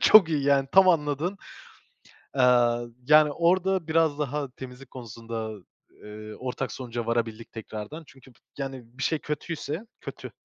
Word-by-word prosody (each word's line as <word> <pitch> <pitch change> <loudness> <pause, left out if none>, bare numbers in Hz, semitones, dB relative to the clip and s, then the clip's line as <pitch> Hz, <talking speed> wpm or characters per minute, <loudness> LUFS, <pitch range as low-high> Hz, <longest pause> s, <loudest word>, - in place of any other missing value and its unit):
çok 210 -6 +8
iyi 150 -3 0
yani 140 -1 +3
tam 190 0 +7
anladın. 160 +2 +1 1.0
Eee, - - +4 0.7
yani 150 0 +7
orada 180 +2 +2
biraz 160 -2 +2
daha 145 -2 -2
temizlik 130 0 -10
konusunda, 115 -2 -6 0.5
eee, 105 0 -9
ortak 125 -1 -3
sonuca 120 -2 -5
varabildik 115 -1 -2
tekrardan. 110 +7 -7
Çünkü 130 -1 -17 0.3
yani 135 -2 -5
bir 135 - -3
şey 160 - +1
kötüyse 150 +2 -4 0.2
kötü, - - -8
140 Hz, 130 wpm, -27 LUFS, 120-160 Hz, 1.0 s, çok